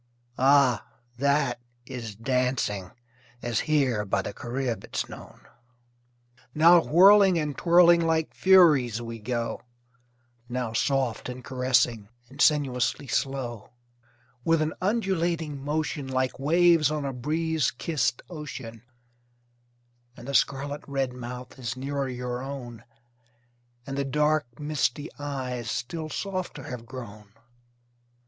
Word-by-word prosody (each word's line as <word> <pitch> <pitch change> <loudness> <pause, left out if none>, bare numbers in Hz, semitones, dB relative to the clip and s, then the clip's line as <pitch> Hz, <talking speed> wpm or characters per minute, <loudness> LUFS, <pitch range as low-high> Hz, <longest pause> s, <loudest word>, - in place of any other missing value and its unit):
Ah! 135 -3 +4 0.3
that 140 -3 +1 0.3
is 120 -5 -7
dancing, 120 -5 -1 0.5
As 120 -2 0
here 130 -8 +2
by 95 - -1
the - - -5
Carib 120 +1 -3
it's - - -3
known. - - -12 1.1
Now, 170 +3 +7
whirling 195 +2 +6
and 150 -3 -2
twirling 170 0 +5
Like 160 -1 0
furies 150 - +5
we 115 -1 -7
go; 120 +2 -3 0.9
Now, 120 -2 -3
soft 130 -1 0
and 125 0 -7
caressing 125 -5 +1 0.2
And 140 +2 -6
sinuously 140 -2 +2
slow; 130 -6 -3 0.7
With 165 +3 +3
an 155 - -2
undulating 170 -8 -1
motion, 150 -1 -2
Like 130 -1 -1
waves 165 +1 +4
on 150 -2 -2
a 135 - -3
breeze 155 +3 0
kissed 135 -1 -1
ocean: 135 -9 -8 1.4
And 120 - -11
the 140 - -4
scarlet 140 +3 +1
red 135 -3 -1
mouth 125 +1 -8
Is 120 0 -4
nearer 140 0 -2
your 125 0 -4
own, 125 -4 -7 1.0
And 135 0 -4
the - - +1
dark, 150 -3 0
misty 150 0 -1
eyes 130 -5 -4
Still 155 +8 -4
softer 185 -6 -4
have 120 -2 -7
grown. 110 -5 -10
135 Hz, 115 wpm, -26 LUFS, 120-155 Hz, 1.4 s, Now